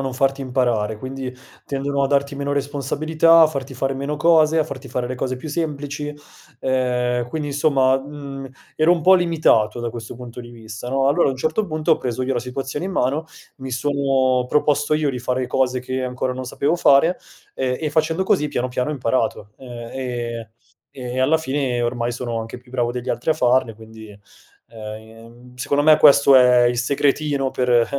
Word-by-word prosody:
non 135 -1 -3
farti 135 +1 0
imparare, 120 -5 0
quindi 130 0 -6 0.3
tendono 140 0 -2
a 135 - +1
darti 140 0 +1
meno 140 0 -3
responsabilità, 155 +4 +3
a - - +7
farti 140 -3 -5
fare 135 +1 -2
meno 140 +2 -3
cose, 160 0 +4
a 155 - +2
farti 135 -1 -8
fare 125 0 -2
le 130 - -4
cose 130 0 -3
più 155 +5 -8
semplici; 145 -2 -3 0.5
ehm, 125 -2 0
quindi 150 +1 -4
insomma, 135 -2 +2
mhmm, 140 -1 -8 0.3
ero 155 +2 +3
un 175 - +3
po' 185 +4 +6
limitato 160 -11 +2
da 120 -1 -3
questo 115 0 -8
punto 125 0 -9
di 120 - -11
vista 115 0 -9
no. 135 +1 +1
Allora 140 0 +3
a - - +1
un 130 - -5
certo 160 +10 0
punto 155 -3 0
ho - - +2
preso 125 0 -3
io 130 0 -1
la 120 - 0
situazione 135 +5 -5
in - - -4
mano, 155 -1 -1 0.3
mi 130 0 -7
sono 130 -1 +1
proposto 150 0 +2
io 150 -1 +1
di 125 -2 -3
fare 125 0 -1
cose 130 0 0
che 130 +1 -4
ancora 125 0 -2
non 130 0 -6
sapevo 140 +6 0
fare, 165 +1 +4 0.4
e 125 -1 -1
e 155 -2 -2
facendo 160 +4 +1
così 190 -8 +1
piano 125 -3 -2
piano 125 +2 -2
ho - - -2
imparato. 120 -5 -1
E 120 -1 -6
ehm, 115 -1 -8 0.4
e 125 -1 -5
alla 155 +5 +3
fine 135 -4 -1
ormai 120 0 -1
sono 120 -1 -4
anche 115 +2 -8
più 125 0 -21
bravo 120 -2 0
degli 125 0 -5
altri 120 +6 -1
a - - +6
farle, 125 -5 +1
quindi, 110 0 -13 0.6
ehm, 115 +3 -11
secondo 140 +3 0
me 155 -1 +7
questo 140 -1 +6
è 125 -1 +6
il 120 0 +1
segretino 140 +1 0
per, 125 -1 -1
ehm, 120 -1 +5
130 Hz, 195 wpm, -21 LUFS, 125-145 Hz, 0.6 s, a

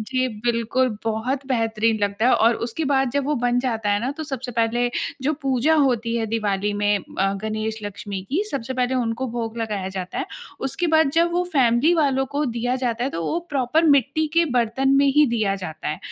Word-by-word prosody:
जी, 255 +3 -1 0.2
बिल्कुल 235 0 +1
बहुत 240 +5 -2
बेहतरीन 225 -3 +1
लगता 200 +3 +1
है 255 - +5
और 230 +1 +4
उसके 315 +7 -3
बाद 265 -1 +2
जब 285 +2 0
वो 300 +2 0
बन 245 0 +2
जाता 225 -5 -1
है 205 0 +2
ना 250 +4 -1
तो 320 - -4
सबसे 265 -4 -5
पहले 235 +1 +1 0.3
जो 290 +4 +1
पूजा 270 +3 +2
होती 245 -6 +1
है 225 -1 -1
दिवाली 210 -2 -1
में 205 0 +2
अ, 195 +1 -2
गणेश-लक्ष्मी 215 -2 -4
की, 340 +9 +1
सबसे 260 -1 -3
पहले 255 0 0
उनको 245 0 -1
भोग 230 -1 -4
लगाया 210 -4 -2
जाता 185 -1 -5
है। - - -2 0.4
उसके 350 +7 -1
बाद 315 -3 +4
जब 340 +1 +3
वो 355 +1 +1
फैमिली 260 +4 +4
वालों 275 -4 +2
को 290 +1 0
दिया 240 +1 -1
जाता 245 -2 -1
है, 270 - -1
तो 165 - -4
वो 325 - 0
प्रॉपर 280 +3 +1
मिट्टी 280 +4 +2
के 335 0 +5
बर्तन 245 +2 +1
में 280 0 +4
ही 300 0 +6
दिया 220 -5 0
जाता 160 -3 -5
है, 150 - -3
240 Hz, 205 wpm, -22 LUFS, 220-270 Hz, 0.4 s, ही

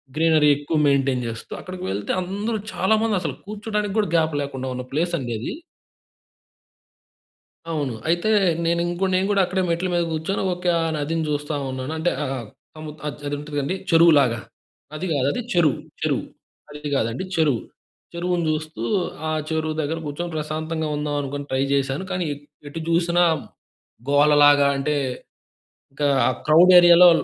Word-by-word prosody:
Greenery 155 -2 +4
ఎక్కువ 145 +3 -2
maintain 135 -2 +2
చేస్తూ. 115 0 -7
అక్కడికి 185 0 -8
వెళ్తే 100 +1 -3
అందరూ 205 +5 -3 0.2
చాలా 190 +4 +2
మంది 225 -2 +1
అసలు - - -3
కూర్చోడానికి 210 0 -3
కూడా 210 -4 +1
గ్యాప్ 160 -1 +2
లేకుండా 135 -2 -5
ఉన్న 125 0 -4
ప్లేస్ 170 +5 -1
అండి 125 -5 -4
అది. 115 - -4 2.2
అవును. 145 -6 -2 0.2
అయితే 175 +5 +1 0.4
నేను 170 +1 +1
ఇంకో 175 +2 -1
నేను 185 +1 +2
కూడా 200 -1 +3
అక్కడే 185 +1 -1
మెట్ల 170 +2 0
మీద 175 0 +2
కూర్చొని 160 +5 -2
ఓకే. 180 0 -2
ఆ - - 0
నదిని 160 +2 -1
చూస్తా 145 +1 -2 0.2
ఉన్నాను. 130 +2 -5
అంటే 165 +2 +1
ఆహ్, 130 -5 -4 0.3
ఆ-ఆ 155 -1 -6 0.2
అది 145 - -3
ఉంటడండి 145 +2 -3
చెరువులాగా. 150 -8 +5 0.5
నది 155 +5 -4
కాదు, 135 -2 +1
అది - - -2
చెరువు. 160 -6 +3 0.3
చెరువు. - - 0 0.4
నది 150 0 -7
కాదండి 115 +4 -1
చెరువు. 150 -7 +2 0.5
చెరువుని 175 0 -1
చూస్తూ, 155 -5 -4 0.5
ఆ - - -1 0.2
చెరువు 160 -1 -1
దగ్గర 155 +2 -2
కూర్చొని 170 +4 -4
ప్రశాంతంగా 155 +1 -3
ఉందాం 145 0 -2
అనుకోని 140 +1 -5
ట్రై 130 0 +1
చేశాను. 135 +3 0
కానీ 180 -1 -1 0.4
ఎటు 165 - -6
చూసినా 170 +1 +3 0.9
గోలలాగా 145 0 +5
అంటే 150 +2 0 1.0
ఇంకా 145 +1 0 0.2
ఆహ్, 130 - 0
క్రౌడ్ 165 +4 +7
ఏరియాలో 175 0 +8
155 Hz, 150 wpm, -23 LUFS, 145-175 Hz, 2.2 s, ఏరియాలో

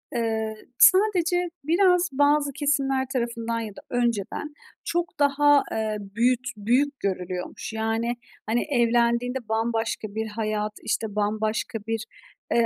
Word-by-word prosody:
Eee, 220 -2 -1 0.2
sadece 360 -3 +5
biraz 360 +3 +3
bazı 285 +1 +3
kesimler 270 -2 +1
tarafından 235 -2 -2
ya 225 -1 -4
da - - -11
önceden 240 +4 -1 0.3
çok 345 -1 -2
daha, 290 0 +4
eee, 220 -1 -1
büyüt 235 +5 0
büyük 260 +7 +1
görülüyormuş. 185 +1 -4
Yani, 225 +2 -1 0.3
hani, 230 +3 +1
evlendiğinde 240 0 +2
bambaşka 225 0 -1
bir 220 0 -2
hayat, 215 -1 -2
işte, 220 -2 -2
bambaşka 215 +1 -1
bir, 225 0 -1 0.5
eee, 235 -1 +4
235 Hz, 120 wpm, -25 LUFS, 220-285 Hz, 0.5 s, sadece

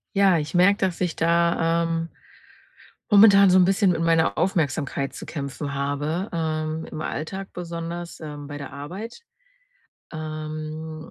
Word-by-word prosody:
Ja, 195 -3 +5
ich 150 -1 -4
merke, 185 +3 +5
dass 185 -3 -1
ich 180 -3 0
da, 170 0 +2
ähm 165 0 -2 1.0
momentan 200 -1 +8
so 185 - +5
'n 180 - +6
bisschen 195 0 +3
mit 170 - -1
meiner 165 -1 +2
Aufmerksamkeit 145 -5 -1
zu - - -8
kämpfen 140 -1 -5
habe, 145 +7 -2
ähm, 160 -1 -2
im 155 - -7
Alltag 190 +6 -5
besonders, 170 0 -6
ähm, 150 -2 -8
bei 145 0 -7
der 140 -2 -8
Arbeit. 185 - -8 0.9
Ähm 155 0 -6
165 Hz, 140 wpm, -24 LUFS, 155-180 Hz, 1.0 s, momentan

